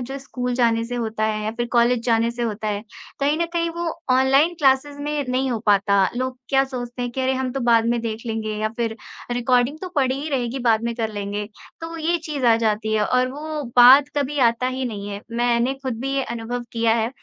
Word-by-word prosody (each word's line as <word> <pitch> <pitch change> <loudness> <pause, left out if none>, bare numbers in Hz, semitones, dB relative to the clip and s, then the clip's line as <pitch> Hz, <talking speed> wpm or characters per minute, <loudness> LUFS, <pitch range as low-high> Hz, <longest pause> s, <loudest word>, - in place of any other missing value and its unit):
जो 270 +3 -5
स्कूल 250 -2 -4
जाने 230 -2 +2
से 245 - -5
होता 220 -2 -2
है 215 -1 -1
या 215 - -1
फिर 240 - -1
कॉलेज 240 0 +3
जाने 230 0 +2
से 240 0 -5
होता 215 -1 -2
है, 205 0 -2 0.4
कहीं 290 +3 +1
न - - 0
कहीं 335 -1 0
वो 340 0 -2 0.3
ऑनलाइन 270 +6 +4
क्लासेस 280 0 +2
में 295 0 -2
नहीं 260 +1 0
हो 235 - -1
पाता। 200 -1 +4
लोग 255 0 -3
क्या 270 -1 +3
सोचते 245 -2 -6
हैं 245 - -2
कि 260 +2 -4
अरे 260 0 +1
हम 260 -1 -2
तो 270 - -3
बाद 230 -2 +4
में 235 0 +1
देख 225 -1 -4
लेंगे 215 -1 -3
अब 220 +1 -2
फिर 230 -2 -2 0.3
रिकॉर्डिंग 245 +4 +1
तो 370 - -5
पड़ी 265 -3 +2
ही 310 - -4
रहेगी 255 -1 -1
बाद 225 -1 +3
में 235 0 -2
कर 225 -2 -2
लेंगे, 205 0 -3 0.4
तो 330 0 -6
ये 335 +2 +1
चीज़ 295 -4 -3
आ 230 - +6
जाती 220 -1 0
है 210 -1 +2
और 255 +2 +2
वो 305 +1 -5
बाद 265 +4 +8
कभी 285 +1 -1
आता 235 0 +3
ही 260 0 -3
नहीं 205 -4 -5
है। 200 0 -5 0.2
मैंने 240 +2 +1
खुद 250 -4 -3
भी 270 +2 -2
ये 275 - +1
अनुभव 235 +1 -4
किया 230 -1 +2
है, 225 -1 0
245 Hz, 235 wpm, -22 LUFS, 225-270 Hz, 0.4 s, बाद